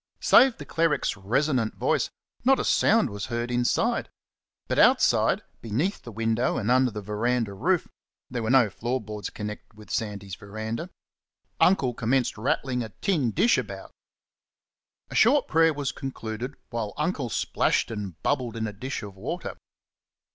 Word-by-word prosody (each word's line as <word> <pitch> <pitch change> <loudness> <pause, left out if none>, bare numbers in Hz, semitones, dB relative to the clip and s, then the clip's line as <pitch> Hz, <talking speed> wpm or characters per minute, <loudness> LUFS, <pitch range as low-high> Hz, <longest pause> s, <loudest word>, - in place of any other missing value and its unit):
Save 260 -3 +6
the 145 - -8
cleric's 160 -3 +1
resonant 120 +4 0
voice, - - +1 0.3
not 270 +2 +4
a - - 0
sound 220 - +3
was 100 +1 -5
heard 120 0 -3
inside. 120 0 +1 0.6
But - - 0
outside, - - +4 0.2
beneath 135 - -1
the 120 - -9
window 115 +2 0
and 115 +1 0
under 130 0 +4
the 105 -2 -7
verandah 110 +1 -1
roof 170 - +1 0.4
there 125 -2 -4
were 110 - -2
no 125 -5 +5
floor 120 +6 -2
boards 105 -3 -6
connected 105 0 -7
with 105 - -12
Sandy's 100 -3 -3
verandah 110 - -5 0.7
Uncle 140 -10 +4
commenced 125 +3 0
rattling 130 +1 -1
a 110 - -5
tin 160 - +1
dish 230 - +3
about. - - -7 1.2
A - - -6
short 290 -1 +4
prayer 165 0 +4
was 145 -3 -2
concluded 125 0 -5 0.2
while 115 -4 -3
Uncle 150 -5 -1
splashed - - 0
and 100 -7 -6
bubbled 125 -5 0
in 110 -1 -2
a 105 - -4
dish 125 +4 -5
of 100 -2 -8
water. 130 - -5
120 Hz, 155 wpm, -26 LUFS, 110-140 Hz, 1.2 s, Save